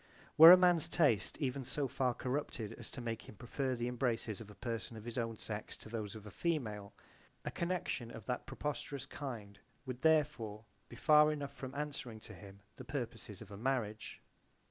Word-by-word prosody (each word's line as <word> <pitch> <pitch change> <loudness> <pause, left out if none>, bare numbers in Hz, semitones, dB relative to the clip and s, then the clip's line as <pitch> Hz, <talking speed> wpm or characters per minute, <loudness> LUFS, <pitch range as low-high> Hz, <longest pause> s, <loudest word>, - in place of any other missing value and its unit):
Were 160 +2 +12
a 180 - +12
man's 175 -3 +5
taste 120 - +2
even 135 -1 -2
so 140 +3 -1
far 130 -1 0
corrupted 125 -5 -3
as - - -9
to 130 - -7
make 115 -1 -4
him - - -11
prefer 130 +4 -2
the 120 0 -2
embraces 120 -4 -1
of 110 - -10
a 105 - -12
person 115 +1 -4
of 110 - -10
his 120 - -5
own 115 -1 -2
sex 105 0 -5
to - - -10
those 110 -3 -4
of 110 -1 -9
a 105 - -9
female, 110 - -2 0.5
a - - -2
connection 170 -9 -2
of 115 -3 -9
that 125 - -3
preposterous 140 -2 -4
kind 115 -9 -7 0.3
would 130 -1 -5
therefore 145 -9 +2 0.2
be - - -10
far 150 +5 +6
enough 140 -2 -4
from 130 -1 -7
answering 140 -6 -4
to 110 - -10
him 100 +1 -12 0.2
the - - -8
purposes 115 -6 -5
of 105 - -16
a 100 - -7
marriage. 110 -3 -2
120 Hz, 190 wpm, -35 LUFS, 110-140 Hz, 0.5 s, Were